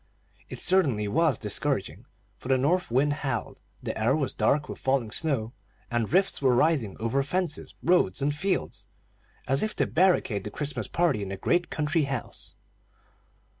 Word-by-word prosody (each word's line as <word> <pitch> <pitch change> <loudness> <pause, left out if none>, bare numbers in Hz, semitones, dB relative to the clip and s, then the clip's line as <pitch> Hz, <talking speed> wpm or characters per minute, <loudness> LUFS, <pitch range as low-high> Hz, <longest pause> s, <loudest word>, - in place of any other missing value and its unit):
It - - -7
certainly 140 - +2
was 155 +2 +2
discouraging; 105 -2 -2 0.3
for - - -9
the 130 0 +3
north 175 +8 +1
wind 135 +5 +2
howled, 125 -6 -3 0.2
the - - -3
air 115 +5 +2
was 140 -4 -1
dark 140 +7 +1
with - - -7
falling 130 -5 0
snow, 130 -7 -1 0.4
and 120 -2 0
drifts 190 0 +1
were 130 -3 +4
rising 135 -8 +1
over 115 +5 0
fences, 170 +3 -3
roads, 170 - +3
and 145 +1 0
fields, 190 +6 -2 0.6
as 135 +2 +4
if 215 - -2
to - - +1
barricade 160 - +2
the - - -5
Christmas 145 +6 -3
party 170 -11 +1
in 100 - -4
the 95 - -5
great 175 - +1
country 155 0 0
house. 135 -4 -6
140 Hz, 165 wpm, -27 LUFS, 115-165 Hz, 0.6 s, were